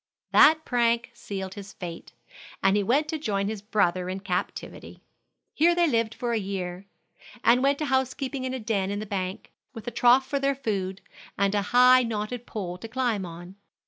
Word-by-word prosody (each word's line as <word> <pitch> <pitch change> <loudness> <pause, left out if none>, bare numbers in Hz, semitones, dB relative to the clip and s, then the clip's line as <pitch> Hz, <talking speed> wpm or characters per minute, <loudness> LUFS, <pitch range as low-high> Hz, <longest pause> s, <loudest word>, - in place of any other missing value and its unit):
That 315 +1 +6
prank 235 0 +1
sealed 190 -4 -6
his 200 -1 -10
fate, 170 -2 -8 0.5
and 195 +1 +4
he 205 - +3
went 270 +10 +2
to 315 - -2
join 200 -8 -1
his 215 -1 -4
brother 185 -4 0
in 190 +1 -4
captivity. 180 -3 -5 0.5
Here 340 +3 +4
they 345 -1 +3
lived 230 -5 0
for 240 -1 -2
a 225 - +1
year, 190 -1 -5 0.6
and 240 +2 +5
went 280 +1 +3
to 305 - -2
housekeeping 265 0 -1
in 260 0 -2
a - - -4
den 210 -4 -1
in 205 - -2
the 215 - -4
bank, 190 -2 -4 0.2
with 225 +1 -9
a - - -2
trough 245 +3 +4
for 280 +1 -2
their 275 0 +1
food, 195 -7 -3 0.4
and 200 0 +2
a 205 - +2
high, 250 +1 +7
knotted 230 +1 -4
pole 180 -4 -5
to 225 - -7
climb 230 -6 -1
on. 175 +3 -10
220 Hz, 190 wpm, -26 LUFS, 195-255 Hz, 0.6 s, high